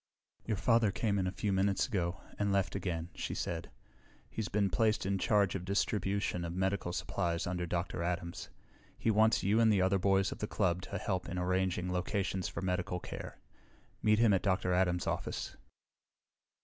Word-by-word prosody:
"Your 110 Hz, -3 st, 0 dB
father 115 Hz, +1 st, +3 dB
came 100 Hz, 0 st, 0 dB
in 95 Hz, -, 0 dB
a -, -, -1 dB
few 100 Hz, +1 st, -1 dB
minutes 95 Hz, 0 st, +2 dB
ago, 95 Hz, -5 st, -2 dB, 0.2 s
and 100 Hz, -1 st, +1 dB
left 100 Hz, -1 st, +1 dB
again," 85 Hz, -3 st, -3 dB
she -, -, -4 dB
said. 85 Hz, -1 st, -3 dB, 0.6 s
"He's 110 Hz, -2 st, -3 dB
been 100 Hz, -2 st, +1 dB
placed 110 Hz, -1 st, +2 dB
in 95 Hz, 0 st, 0 dB
charge 100 Hz, 0 st, +3 dB
of 95 Hz, -, -3 dB
distribution 100 Hz, -1 st, 0 dB
of 85 Hz, 0 st, -4 dB
medical 95 Hz, -1 st, 0 dB
supplies 85 Hz, -1 st, -1 dB
under 90 Hz, 0 st, -2 dB
Dr. 85 Hz, +1 st, -2 dB
Adams. 85 Hz, 0 st, -3 dB, 0.5 s
He 115 Hz, -, +1 dB
wants 110 Hz, +1 st, +4 dB
you 105 Hz, +4 st, +3 dB
and 115 Hz, -1 st, +5 dB
the 100 Hz, -3 st, +3 dB
other 95 Hz, +1 st, +2 dB
boys 95 Hz, 0 st, +2 dB
of -, -, -7 dB
the 105 Hz, -, -2 dB
club 90 Hz, -5 st, 0 dB
to 100 Hz, -, -5 dB
help 95 Hz, -1 st, -2 dB
in 90 Hz, -, -4 dB
arranging 90 Hz, 0 st, 0 dB
locations 95 Hz, 0 st, -1 dB
for -, -, -5 dB
medical 90 Hz, -1 st, -1 dB
care. -, -, -7 dB, 0.6 s
Meet 110 Hz, 0 st, +4 dB
him 115 Hz, -2 st, +5 dB
at 95 Hz, -, +2 dB
Dr. 95 Hz, -2 st, +1 dB
Adams' 90 Hz, -1 st, +2 dB
office." -, -, -3 dB
95 Hz, 180 wpm, -33 LUFS, 90-100 Hz, 0.6 s, and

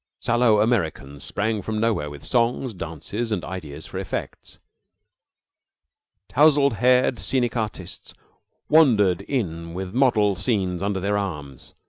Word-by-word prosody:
Sallow 120 Hz, -3 st, +3 dB
Americans 80 Hz, -, -1 dB
sprang 110 Hz, 0 st, -1 dB
from 110 Hz, +2 st, -3 dB
nowhere 110 Hz, -10 st, 0 dB
with 75 Hz, -1 st, -10 dB
songs, 120 Hz, 0 st, 0 dB
dances, 90 Hz, +7 st, -5 dB
and 95 Hz, -6 st, -2 dB
ideas 80 Hz, -5 st, -7 dB
for -, -, -6 dB
effects. -, -, -6 dB, 1.7 s
Tousled 145 Hz, -5 st, +4 dB
haired 125 Hz, +1 st, +3 dB
scenic 125 Hz, -3 st, 0 dB
artists 110 Hz, -3 st, -5 dB, 0.5 s
wandered 110 Hz, -, +4 dB
in 85 Hz, -, -3 dB
with 95 Hz, 0 st, -5 dB
model 110 Hz, -6 st, +3 dB
scenes 95 Hz, -4 st, -1 dB
under 100 Hz, -1 st, -1 dB
their 100 Hz, +2 st, 0 dB
arms. 75 Hz, -9 st, -7 dB
105 Hz, 120 wpm, -23 LUFS, 90-120 Hz, 1.7 s, Tousled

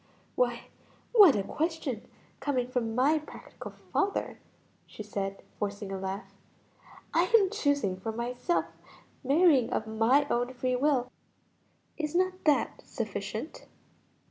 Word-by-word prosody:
"Why -, -, 0 dB, 0.4 s
what 405 Hz, -, +8 dB
a 200 Hz, -, 0 dB
question 305 Hz, -, -3 dB, 0.3 s
coming 265 Hz, -3 st, 0 dB
from 235 Hz, -3 st, -2 dB
my 285 Hz, +5 st, +3 dB
practical 305 Hz, -, -10 dB
father!" 400 Hz, 0 st, -2 dB, 0.5 s
she 215 Hz, -, -8 dB
said, 195 Hz, -1 st, -4 dB, 0.2 s
forcing 205 Hz, -1 st, -3 dB
a 195 Hz, -, -3 dB
laugh. 190 Hz, +2 st, -5 dB, 0.8 s
"I -, -, +4 dB
am 390 Hz, -2 st, +1 dB
choosing 285 Hz, -, 0 dB
for 220 Hz, +4 st, -3 dB
myself, 245 Hz, +9 st, -1 dB, 0.6 s
marrying 280 Hz, -2 st, +4 dB
of 220 Hz, -, -1 dB
my 225 Hz, +6 st, +3 dB
own 245 Hz, 0 st, -1 dB
free 255 Hz, 0 st, 0 dB
will; 255 Hz, -2 st, +1 dB, 0.9 s
is 305 Hz, 0 st, -3 dB
not 370 Hz, +1 st, 0 dB
that 300 Hz, -2 st, +2 dB
sufficient?" -, -, -5 dB
255 Hz, 120 wpm, -29 LUFS, 220-310 Hz, 0.9 s, what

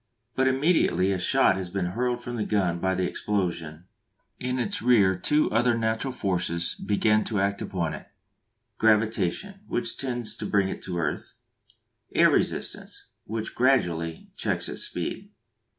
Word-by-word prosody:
But 130 Hz, 0 st, +2 dB
immediately 130 Hz, -, +2 dB
a 95 Hz, -, 0 dB
shot 90 Hz, -, +3 dB
has 95 Hz, -2 st, -4 dB
been 95 Hz, 0 st, -2 dB
hurled 120 Hz, +2 st, -1 dB
from 120 Hz, -, -5 dB
the 110 Hz, -, -1 dB
gun 95 Hz, -5 st, 0 dB
by 95 Hz, +1 st, 0 dB
the 95 Hz, 0 st, 0 dB
explosion 85 Hz, -5 st, -3 dB, 0.5 s
in 125 Hz, 0 st, -2 dB
its 120 Hz, -5 st, -2 dB
rear 105 Hz, -6 st, +4 dB
two 150 Hz, +12 st, +1 dB
other 120 Hz, +1 st, +3 dB
natural 115 Hz, +3 st, -1 dB
forces 90 Hz, -7 st, -1 dB
begin 105 Hz, +1 st, +1 dB
to 105 Hz, -4 st, -1 dB
act 100 Hz, +1 st, 0 dB
upon 85 Hz, -4 st, -2 dB
it: 75 Hz, -, -9 dB, 0.7 s
Gravitation, 110 Hz, -, +1 dB
which 120 Hz, -, -1 dB
tends 120 Hz, -5 st, -3 dB
to -, -, -4 dB
bring 100 Hz, -2 st, +2 dB
it -, -, -6 dB
to 90 Hz, -2 st, -3 dB
earth. 85 Hz, -, -3 dB, 0.8 s
Air -, -, +6 dB
resistance, -, -, -2 dB, 0.2 s
which 110 Hz, +1 st, -4 dB
gradually 85 Hz, -11 st, +1 dB
checks -, -, -1 dB
its -, -, -4 dB
speed. -, -, -3 dB
105 Hz, 150 wpm, -26 LUFS, 90-120 Hz, 0.8 s, Air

